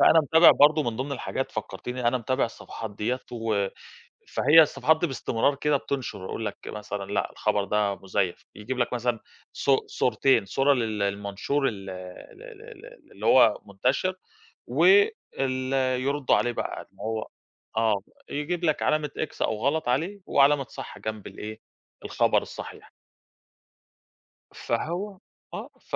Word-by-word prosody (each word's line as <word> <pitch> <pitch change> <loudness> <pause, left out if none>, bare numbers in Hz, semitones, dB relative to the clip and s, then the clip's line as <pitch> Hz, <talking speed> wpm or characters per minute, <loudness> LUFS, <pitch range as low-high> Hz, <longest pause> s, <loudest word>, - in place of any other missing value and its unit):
فأنا 160 - +7
متابع 160 +4 +7
برضه 150 +1 +5
من 115 -3 -2
ضمن 135 +2 -3
الحاجات 135 - -3
فكّرتيني 125 -1 -3
أنا 125 +1 +1
متابع 130 +3 0
الصفحات 115 -1 -7
ديّة 125 +4 -1
و 110 -4 0 0.6
فهي 155 +4 +6
الصفحات 160 +1 +3
دي 175 - +1
باستمرار 135 0 0
كده 150 +1 +1
بِتُنْشر، 130 -9 -4
أقول 110 - -4
لك 105 - -4
مثلًا 105 -2 -5
"لأ، 105 - -1
الخبر 105 -1 0
ده 100 0 0
مُزَيَّف." 95 -2 -2
يجيب 110 +5 -5
لك 125 0 0
مثلًا 120 -1 -1 0.3
صو 135 -1 +2
صورتين: 125 -1 +2
صورة 135 +7 +3
للمنشور 105 +3 -1
ال 100 -3 -5
آآ، 90 -1 -9
ال 400 - -16
ال 455 -4 -12 0.2
ال - - -16
اللي - - -8
هو - - +6
المُنتَشِر 185 0 0 0.5
و - - +1 0.6
ال 130 0 -1 0.3
يردوا 140 0 +2
عليه 120 - +1
بقى - - -4
إن - - -20
هو 110 +1 -3 0.5
آه، 110 -3 +2 0.3
يجيب 160 +5 -3
لك 155 -2 +1
علامة 155 -1 +1
x 155 - -4
أو 110 - +1
غلط 150 -1 +1
عليه 170 +11 -1
وعلامة 140 0 +4
صح - - -9
جنب 110 -1 -5
الإيه، 110 +1 -8 0.5
الخبر - - +2
الصَّحيح. - - -9 1.6
فهو 180 - -3 0.4
آه، - - -6
ف - - -5
125 Hz, 150 wpm, -26 LUFS, 105-145 Hz, 1.6 s, فأنا